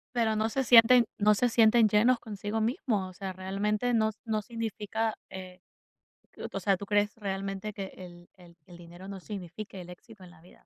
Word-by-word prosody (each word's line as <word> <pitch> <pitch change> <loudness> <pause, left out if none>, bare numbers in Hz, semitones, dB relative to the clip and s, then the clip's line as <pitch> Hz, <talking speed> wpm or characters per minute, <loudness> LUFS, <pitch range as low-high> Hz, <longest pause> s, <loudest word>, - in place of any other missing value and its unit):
Pero 225 -2 +1
no 215 +1 +1
se 265 +4 -1
sienten 240 -1 +7
no 210 0 +4
se 245 +4 +2
sienten 225 -1 +5
llenos 235 +4 +3
consigo 210 0 -4
mismos. 220 -4 -1
O - - -13
sea, 190 +1 -6
realmente 205 +5 -1
no 220 -2 +3
s 215 - -25
no 220 -3 -1
significa, 225 0 -3 0.2
eh, 185 -1 -9 0.9
o 195 - -3
sea, 195 +1 +2
¿tú 200 +1 -9
crees 205 0 +1
realmente 195 0 -4
que 195 -2 -7
el 175 -1 -12
el 175 -2 -18
el 175 - -14
dinero 175 +2 -12
no 195 -1 -7
signifique 195 0 -8
el 180 -1 -10
éxito 195 +2 -15
en 175 - -13
la 160 - -19
vida? 175 - -20
205 Hz, 195 wpm, -29 LUFS, 190-220 Hz, 0.9 s, sienten